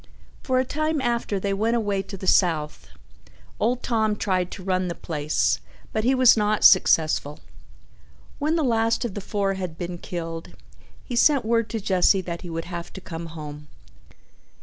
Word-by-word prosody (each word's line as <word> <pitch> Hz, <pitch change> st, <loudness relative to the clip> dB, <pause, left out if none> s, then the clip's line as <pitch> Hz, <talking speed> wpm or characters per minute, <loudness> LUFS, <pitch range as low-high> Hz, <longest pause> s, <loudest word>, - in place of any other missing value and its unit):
For 260 Hz, -1 st, 0 dB
a 255 Hz, -, +2 dB
time 310 Hz, +3 st, -1 dB
after 235 Hz, -5 st, -1 dB
they 195 Hz, +1 st, -1 dB
went 220 Hz, +4 st, +1 dB
away 205 Hz, -4 st, 0 dB
to 195 Hz, 0 st, -9 dB
the 190 Hz, -, -7 dB
South, 160 Hz, -6 st, +1 dB, 0.7 s
old 245 Hz, +3 st, 0 dB
Tom 220 Hz, -3 st, +1 dB
tried 185 Hz, -3 st, -1 dB
to 190 Hz, -, -9 dB
run 185 Hz, -1 st, 0 dB
the 170 Hz, -, -4 dB
place, 150 Hz, -2 st, 0 dB, 0.3 s
but 215 Hz, -, 0 dB
he 260 Hz, +3 st, +3 dB
was 255 Hz, -2 st, +6 dB
not 210 Hz, -1 st, +1 dB
successful. 155 Hz, -5 st, +4 dB, 1.0 s
When 310 Hz, +2 st, +1 dB
the 325 Hz, -, +1 dB
last 230 Hz, -1 st, +1 dB
of 225 Hz, -, -4 dB
the 205 Hz, -, -5 dB
four 200 Hz, 0 st, -1 dB
had 180 Hz, -4 st, -5 dB
been 175 Hz, -1 st, -5 dB
killed 165 Hz, -2 st, -6 dB, 0.5 s
he 245 Hz, -, -5 dB
sent 270 Hz, 0 st, +4 dB
word 230 Hz, 0 st, +1 dB
to 225 Hz, -, -3 dB
Jesse 190 Hz, -1 st, +3 dB
that 170 Hz, -2 st, -6 dB
he 175 Hz, -, -8 dB
would 165 Hz, 0 st, -4 dB
have 175 Hz, -1 st, -6 dB
to -, -, -7 dB
come 170 Hz, -2 st, -7 dB
home. 150 Hz, -2 st, -9 dB
195 Hz, 175 wpm, -24 LUFS, 170-230 Hz, 1.0 s, was